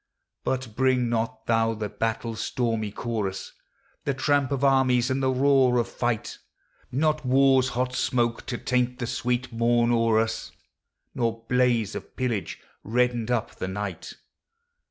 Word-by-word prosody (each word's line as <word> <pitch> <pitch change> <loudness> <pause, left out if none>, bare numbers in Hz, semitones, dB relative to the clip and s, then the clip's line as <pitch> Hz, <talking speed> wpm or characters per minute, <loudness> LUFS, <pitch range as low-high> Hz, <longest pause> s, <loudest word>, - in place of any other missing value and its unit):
But 130 -4 -3
bring 130 -1 +2
not 115 -1 -2
thou 115 0 +2
the 105 -1 -3
battle's 115 +1 -3
stormy 115 -4 -1
chorus, 105 -4 -4 0.5
The 140 - -1
tramp 140 -1 +1
of 140 -1 -1
armies, 130 -2 +3
and 135 +1 0
the 130 - +2
roar 130 -1 +4
of 120 - -1
tight, 120 -3 -2 0.5
Not 155 +3 +1
war's 130 0 +4
hot 125 0 0
smoke 120 -2 0
to 120 - -2
taint 125 0 0
the 125 - -3
sweet 120 +1 -2
morn 120 +1 +2
o'er 115 -1 +3
us 115 0 -2 0.6
Nor 115 -1 -2
blaze 120 -4 +2
of - - -8
pillage, 120 -6 -2 0.2
reddening 120 0 0
up 120 -2 -1
the - - -3
night. 95 -2 -5
120 Hz, 145 wpm, -26 LUFS, 115-130 Hz, 0.6 s, roar